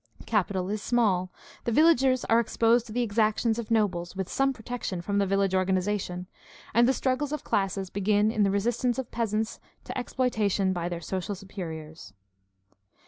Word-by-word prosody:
Capital 190 -4 0
is 210 0 -2
small. 195 -7 +1 0.3
The 235 - 0
villagers 265 -3 +4
are 230 - +4
exposed 235 +1 +2
to - - -10
the 245 +2 0
exactions 220 +1 +1
of 235 - -5
nobles, 190 -6 0
with 190 -1 -3
some 270 0 +2
protection 240 -6 -5
from 200 +4 -1
the 200 - +2
village 195 0 +1
organization; 185 -1 0 0.5
and 235 +2 +5
the - - +5
struggles 270 +2 -1
of 300 -2 -3
classes 195 -1 -1
begin 205 +2 +2
in 220 - 0
the 200 - +4
resistance 235 +5 0
of 265 -3 -4
peasants 220 -1 -1 0.2
to - - -7
exploitation 220 -7 0
by 175 -1 -2
their 170 -1 -4
social 190 +3 -3
superiors. 160 - -8
210 Hz, 165 wpm, -27 LUFS, 190-235 Hz, 0.5 s, and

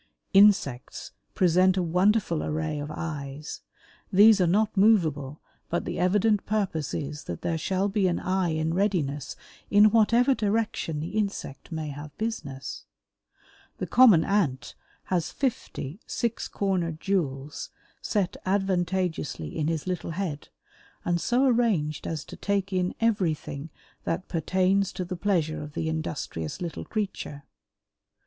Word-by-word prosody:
Insects 195 -11 +3 0.2
present 185 +1 +4
a 185 - +2
wonderful 180 0 +2
array 155 0 -2
of 145 +1 -5
eyes. 150 -2 -5 0.5
These 205 +1 +7
are 180 - +4
not 210 +5 +2
movable, 160 -9 +2 0.3
but 170 - -1
the - - -3
evident 205 +3 +3
purpose 190 -8 -1
is 150 +1 -5
that 85 - -6
there 165 - 0
shall 190 +4 0
be 200 -1 +1
an 175 - 0
eye 185 -1 0
in 160 0 0
readiness 165 -8 -1 0.3
in 210 +1 +6
whatever 230 +4 +4
direction 210 - -1
the 160 - -4
insect 200 -10 -3
may 160 -2 -3
have 145 +1 -9
business. 145 -12 -5 0.9
The - - -3
common 225 -10 +6
Ant 180 -11 0 0.4
has 175 -2 +1
fifty 210 - -3
six 235 -2 -2
cornered 175 -5 -1
jewels 145 -8 -2 0.3
set 200 -5 0
advantageously 185 - -1
in 150 - 0
his 160 -2 -1
little 180 -2 -3
head 165 -7 -3 0.6
and 175 -1 +1
so 250 +3 +2
arranged 220 - +1
as 160 -3 -4
to - - -10
take 200 -1 -1
in 185 0 0
everything 170 -9 -1 0.4
that 180 +3 -2
pertains 185 +4 +1
to 185 - -3
the 180 +1 -4
pleasure 170 -5 0
of 150 0 -8
the 160 - -2
industrious 155 - -4
little 170 -2 -5
creature. 195 -9 -4
180 Hz, 135 wpm, -27 LUFS, 155-200 Hz, 0.9 s, These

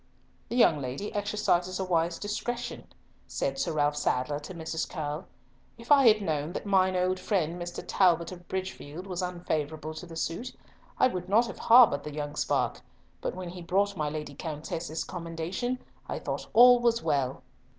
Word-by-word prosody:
"The - - -3
young 165 - +5
lady 135 +11 -4
exercises 200 -3 0
a - - 0
wise 170 -2 +1
discretion," 240 +5 -4 0.4
said - - -2
Sir 170 -10 -1
Ralf 145 -1 +2
Sadler 145 0 0
to 150 +5 -9
Mrs. 160 -1 -3
Curll. 150 0 -4 0.5
"If 230 +4 -8
I 275 -3 +7
had 215 -2 +5
known 155 -1 -1
that - - -5
mine 190 -2 +3
old 185 +1 +1
friend 175 -4 -1
Mr. 175 0 -5
Talbot 170 -3 +3
of 175 -1 -11
Bridgefield 185 -3 -5
was 185 -2 -3
unfavourable 155 -4 -3
to 175 +3 -8
the 165 - -10
suit, 165 +9 -3 0.4
I - - +5
would 180 -6 -5
not 225 +4 +5
have 235 - -8
harboured 230 - +6
the 150 -1 -7
young 145 -1 -4
spark, - - 0 0.4
but - - -3
when 185 -1 -6
he 180 +1 -8
brought 200 +4 +1
my 150 -3 -1
Lady 150 -1 -5
Countess's 160 +2 -4
commendation, 175 +8 -3 0.3
I - - -2
thought - - -4
all 245 +1 +8
was 235 -1 +2
well." 135 -2 0
175 Hz, 175 wpm, -29 LUFS, 155-200 Hz, 0.5 s, all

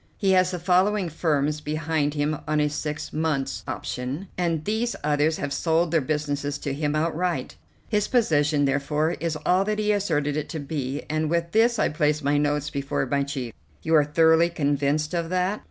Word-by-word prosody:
He 195 -2 +2
has 185 -1 +4
the 180 - -3
following 185 +2 +2
firms 150 -2 0
behind 150 -1 -1
him 150 +1 0
on 155 0 +1
a 150 0 +2
six 150 0 -4
months' 150 -4 -1
option, 135 +9 -4
and 165 -3 -1
these 220 +3 -1
others 150 +1 +2
have 145 -1 -3
sold 165 +1 +1
their 165 -2 +3
businesses 145 0 -2
to 140 -1 -4
him 145 +1 -1
outright. 165 +3 -1 0.3
His 210 -2 +1
position, 150 - +2
therefore, 145 +3 0
is 165 -1 -2
all 185 +2 +3
that 210 0 -1
he 210 0 +1
asserted 160 -8 0
it 150 - -3
to 160 - -4
be," 140 -1 -4
and 155 0 -1
with 170 0 0
this 230 +2 +3
I - - +2
placed 150 -1 0
my 145 +1 +2
notes 150 0 0
before 140 -1 -2
my 140 +2 0
chief. 135 -5 -4 0.3
"You 160 - 0
are 155 -2 +6
thoroughly 160 +3 +4
convinced 145 0 0
of 170 -1 -1
that?" 185 +3 0
155 Hz, 185 wpm, -25 LUFS, 145-170 Hz, 0.3 s, are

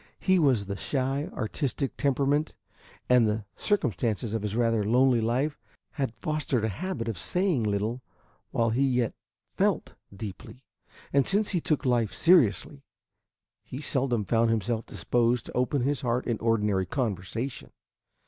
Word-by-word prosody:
His 185 -1 +3
was 130 -10 +3
the 100 0 -4
shy 135 +6 -1
artistic 135 +3 -3
temperament, 140 +2 +1 0.5
and 125 -3 +5
the 105 0 -1
circumstances 115 - 0
of 115 - -1
his 105 0 -3
rather 115 -2 +2
lonely 125 +2 +3
life 130 +7 0 0.3
had 135 -6 -3
fostered 150 -7 -1
a - - 0
habit 165 - -4
of 110 -6 -3
saying 180 - 0
little 105 +4 -1 0.5
while 115 -1 +1
he 120 +4 +1
yet 125 -4 +1 0.4
felt - - 0 0.2
deeply, 100 +5 -9 0.5
and 140 -2 +3
since 205 +2 +1
he 175 -4 0
took 150 -2 0
life 120 -4 +1
seriously, 145 - +3 0.8
he 125 +5 -7
seldom 130 -7 0
found 115 +1 +2
himself 115 +1 -1
disposed 120 0 0
to - - -9
open 125 +1 +1
his 140 +1 0
heart 125 0 0
in 115 -3 -1
ordinary 105 -4 +1
conversation. 115 +1 -3
120 Hz, 145 wpm, -27 LUFS, 110-140 Hz, 0.8 s, and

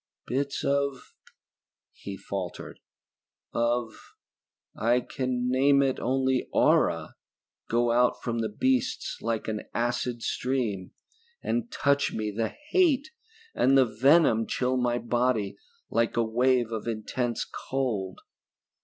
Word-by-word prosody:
"Bits 140 +2 -2
of 140 -1 -1 0.4
..." - - -67
He 100 -1 -8
faltered. 95 -3 -6 0.7
"Of... 120 -1 -2 0.6
I 120 +3 +2
can 125 -1 -2
name 140 +2 +4
it 135 -1 0
only 130 0 0
aura, - - +2 0.5
go 120 +1 +2
out 125 +1 +3
from 115 -1 -2
the 110 - -1
beasts 260 0 0
like 115 -1 -2
an 110 -1 -2
acid 120 0 -1
stream, 115 -8 -2 0.5
and 240 0 -1
touch 140 0 +1
me, 110 -1 -2
and 105 +2 -7
the 115 - +1 0.2
hate, 320 - +3 0.4
and 135 +1 +4
the 130 - +6
venom 115 0 +4
chill 130 0 0
my 120 -1 +1
body 120 -3 0 0.4
like 115 0 +1
a 115 - +4
wave 120 +1 +2
of 110 0 -4
intense 115 +1 -2
cold. 110 -9 -3
125 Hz, 125 wpm, -27 LUFS, 115-135 Hz, 0.7 s, the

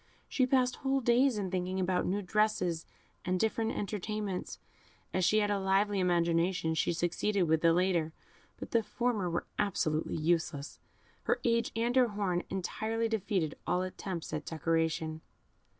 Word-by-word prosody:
She 255 -2 +1
passed 255 -1 +2
whole 270 0 +1
days 245 0 +3
in 190 -3 -2
thinking 185 0 -1
about 180 -1 +1
new 200 +3 -1
dresses 185 -4 0 0.4
and 185 0 0
different 225 +1 0
entertainments. 210 -1 -3 0.6
As 185 - +1
she 215 +5 +4
had 205 0 +1
a 200 - +1
lively 195 +1 +2
imagination, 170 -1 +2
she 160 - +1
succeeded 175 +4 0
with 160 -1 +2
the 165 - +5
latter, 170 -2 +2 0.5
but - - -8
the 230 - +3
former 225 -4 -1
were 170 - -2
absolutely 160 -6 0
useless 155 -2 -1 0.5
her - - +1
age 230 -1 +1
and 235 +2 0
her 255 -2 +5
horn 200 -5 -1
entirely 220 +4 -2
defeated 195 -7 -1
all 180 - +1
attempts 185 -3 -5
at 155 -1 -2
decoration. 160 0 -1
190 Hz, 150 wpm, -31 LUFS, 170-215 Hz, 0.6 s, the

